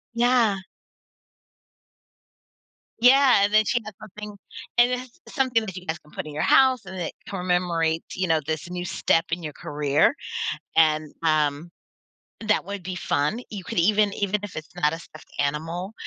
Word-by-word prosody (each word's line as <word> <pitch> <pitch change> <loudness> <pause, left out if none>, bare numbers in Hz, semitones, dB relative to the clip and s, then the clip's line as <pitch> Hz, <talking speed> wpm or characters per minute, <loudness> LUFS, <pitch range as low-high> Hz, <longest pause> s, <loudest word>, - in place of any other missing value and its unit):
Yeah. 235 -4 +3 2.4
Yeah, 255 -3 +6
and 205 +1 +1
then 215 0 +5
she 240 - +1
has 215 - -8
something 210 0 -9 0.4
and 240 +1 +5
it's 250 +4 -5
something 250 -5 +1
that 190 -4 -7
you 180 -1 -8
guys 160 0 -2
can 150 - -22
put - - -5
in 150 - -8
your 150 - -1
house 260 -3 +4
and 190 - -8
that 170 - -3 0.2
commemorates, 175 -3 -1
you 185 0 -1
know, 160 -1 +3
this 155 +2 -3
new 180 0 -4
step 165 -1 +1
in 170 +1 -1
your 150 -2 -5
career. 145 - +1 0.6
And, 155 -1 +3
um, 155 0 +1 0.8
that 210 - +2
would 200 -1 -5
be 185 +1 -5
fun. 160 +4 0
You 200 -3 -6
could 230 +1 -6
even 205 +4 +3
even 200 +1 0
if 205 - -7
it's 155 +2 -8
not 150 -3 +1
a 165 - -5
stuffed 155 - -15
animal, 165 +7 -2
180 Hz, 170 wpm, -24 LUFS, 160-215 Hz, 2.4 s, Yeah